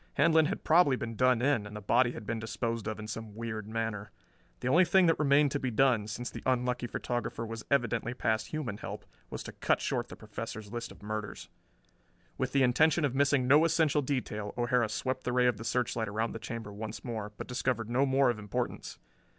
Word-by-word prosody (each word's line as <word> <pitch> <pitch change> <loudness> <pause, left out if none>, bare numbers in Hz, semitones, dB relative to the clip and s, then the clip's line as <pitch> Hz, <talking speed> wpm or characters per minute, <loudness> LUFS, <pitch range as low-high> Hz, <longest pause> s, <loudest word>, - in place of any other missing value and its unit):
Handlon 160 +1 +4
had 200 - -4
probably 160 -4 +5
been 115 -2 -5
done 125 0 +3
in, 130 -7 +2
and 105 - -10
the - - -4
body 120 +4 +2
had 110 - -8
been 115 +1 -2
disposed 115 0 -3
of 110 - -3
in 110 0 -7
some 110 -1 -6
weird 110 -2 -5
manner. 110 -2 -3 0.5
The 125 - -2
only 170 +8 +6
thing 190 +1 +4
that 165 - +3
remained 145 -1 +4
to 145 - -1
be 130 - -1
done, 120 -3 +2
since 120 +3 -5
the - - -7
unlucky 125 -1 0
photographer 120 -1 -3
was 115 0 -6
evidently 120 -3 +1
past 110 -2 0
human 130 -10 -4
help, - - -7 0.2
was - - -6
to - - -7
cut - - +1
short - - -1
the - - -9
Professor's 105 -2 -7
list 120 -1 -5
of - - -15
murders. 105 0 -5 0.9
With 130 -1 -2
the 135 0 +3
intention 155 +5 +4
of 135 - -1
missing 140 -2 +2
no 145 +4 +6
essential 160 -3 +3
detail 115 -7 -3
O'Hara 120 -1 +2
swept 130 +4 -2
the 125 - -2
ray 125 0 +3
of 125 -4 +2
the 115 - -7
searchlight 115 -1 -1
around 110 +2 -1
the 115 - -6
chamber 115 -2 -6
once 110 +1 -6
more, 110 -3 -4
but - - -5
discovered 125 -2 -1
no 125 +4 +2
more 135 -1 +4
of 110 - -6
importance. 105 -2 -4
120 Hz, 215 wpm, -30 LUFS, 110-135 Hz, 0.9 s, only